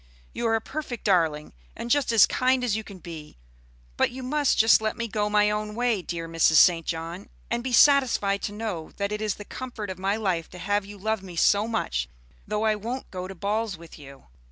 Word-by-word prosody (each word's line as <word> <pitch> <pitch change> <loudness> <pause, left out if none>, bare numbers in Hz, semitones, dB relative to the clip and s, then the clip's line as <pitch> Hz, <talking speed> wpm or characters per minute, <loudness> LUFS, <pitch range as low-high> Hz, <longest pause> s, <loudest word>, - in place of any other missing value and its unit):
You 235 - -1
are 225 - +2
a 225 - 0
perfect 265 -3 -6
darling, 165 -6 +1 0.2
and 235 - -5
just 285 -3 +2
as 225 -3 +7
kind 255 0 +1
as 235 -4 +1
you 220 - -3
can 200 -2 -11
be; 160 - -10 0.6
but - - +3
you 260 +1 -8
must 290 +2 +1
just 225 0 +6
let 215 0 -2
me 230 0 -2
go 210 -1 -1
my 210 0 +3
own 210 0 -3
way, 240 -4 +1
dear 170 -1 -5
Mrs. 165 -1 +3
St. 165 0 +5
John, 165 +3 -5 0.2
and 235 0 -1
be 260 - -3
satisfied 245 -7 +4
to - - -3
know 205 -7 -5
that 200 0 -2
it 210 0 -3
is 215 -2 -1
the 205 - -10
comfort 230 -6 -6
of 185 - -8
my 195 +2 0
life 185 -7 -1
to 180 - -11
have 205 +2 -1
you 205 0 -10
love 220 +1 -1
me 185 -3 -10
so 205 +5 +3
much, 65 - -2 0.4
though 210 +1 -1
I 215 - +3
won't 235 +5 -6
go 185 -1 -5
to 195 - -9
balls 205 +1 -2
with 165 -1 -13
you." 140 -1 -13
210 Hz, 225 wpm, -26 LUFS, 180-230 Hz, 0.6 s, as